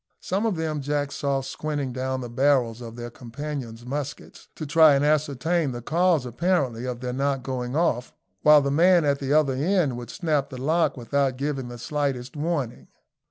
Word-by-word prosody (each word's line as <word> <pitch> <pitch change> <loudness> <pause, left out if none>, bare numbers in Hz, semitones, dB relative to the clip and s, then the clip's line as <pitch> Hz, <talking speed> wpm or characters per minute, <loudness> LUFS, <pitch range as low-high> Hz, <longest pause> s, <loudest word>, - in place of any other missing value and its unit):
Some 200 +5 -1
of 210 - 0
them 155 -2 -2
Jack 145 0 -1
saw 140 -1 -1
squinting 140 0 -4
down 130 +1 -2
the 120 - -5
barrels 125 -2 +1
of 115 -1 -8
their 120 0 -7
companions' 120 -1 -7
muskets, 140 +2 -6
to 155 - -5
try 155 0 +6
and 140 +1 +2
ascertain 150 0 +1
the 120 - -6
cause, 165 -1 +2
apparently, 125 -3 0
of 125 -1 -4
their 125 -1 -3
not 135 0 -1
going 125 0 -3
off, 130 -7 +1 0.3
while 150 -1 +7
the 140 - 0
man 170 +2 +5
at 140 -1 +1
the 135 0 -3
other 150 -3 +4
end 150 -2 +1
would 120 -2 -8
snap 155 -6 -1
the 130 - -8
lock 160 +3 +1
without 130 +1 0
giving 140 -2 -2
the 120 0 -8
slightest 135 -1 -3
warning. 145 -6 -3
140 Hz, 185 wpm, -25 LUFS, 125-155 Hz, 0.3 s, while